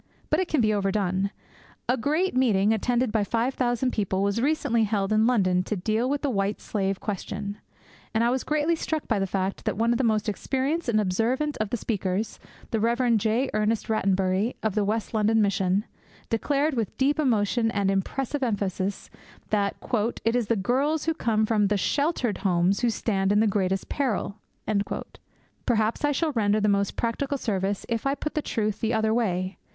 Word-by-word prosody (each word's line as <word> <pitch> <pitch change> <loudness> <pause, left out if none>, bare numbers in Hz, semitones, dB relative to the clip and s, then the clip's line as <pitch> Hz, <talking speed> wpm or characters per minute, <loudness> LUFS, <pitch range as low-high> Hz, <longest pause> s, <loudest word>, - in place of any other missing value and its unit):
But - - +3
it 375 - 0
can 300 -6 +1
be 215 -1 +3
overdone. 195 -1 0 0.6
A 250 - +3
great 305 +8 0
meeting, 220 -5 +3
attended 240 +2 +1
by 215 -1 +1
five 230 +5 0
thousand 250 0 0
people, 195 -2 -1
was 200 +3 0
recently 245 -5 +2
held 205 -1 0
in 215 +1 +4
London 185 -7 +3
to 215 - -2
deal 215 +6 0
with 285 0 -1
the 285 - +1
White 200 -1 -1
Slave 195 -2 -2
question. 205 0 -4 0.5
And 225 +1 +1
I 235 - +3
was 260 0 -1
greatly 305 +2 +1
struck 315 -1 -3
by 220 -4 +1
the 195 - 0
fact 190 +1 -2
that - - -1
one 230 +2 +2
of 235 - +1
the - - +2
most 215 -2 +1
experienced 270 - -1
and 215 -2 +3
observant 230 +10 0
of 215 -2 -2
the 240 - -1
speakers 200 -1 -2 0.3
the 225 - +1
Rev. 235 +2 +2
J. 225 +5 0
Ernest 215 +1 0
Rattenbury, 195 +1 +1
of 220 -2 0
the 210 - +1
West 215 +3 -2
London 220 +1 +3
Mission 195 0 +1 0.5
declared 285 +6 +1
with 225 -6 -2
deep 285 +3 +2
emotion 225 -4 +2
and 200 -2 +1
impressive 265 +9 -2
emphasis 200 -4 -2 0.4
that 200 -2 +1 0.5
'it 230 +1 +2
is 240 -4 +1
the 230 - +2
girls 270 +10 0
who 325 - +1
come 220 -7 +1
from 210 -2 +2
the 205 +1 +1
sheltered 280 - 0
homes 185 0 +2
who 240 - +2
stand 200 -3 0
in 205 - +4
the 220 - +4
greatest 195 -2 0
peril.' 225 -6 -2 1.3
Perhaps 225 +2 +1
I 290 - +3
shall 310 +2 0
render 215 -4 +2
the 210 - +1
most 200 -1 +1
practical 270 +5 -1
service 200 -5 -2
if 230 +3 -1
I 275 - +1
put 300 - -4
the 305 - 0
truth 215 -5 -2
the 225 +1 0
other 220 0 +2
way. 190 -5 -1
220 Hz, 190 wpm, -26 LUFS, 200-250 Hz, 1.3 s, in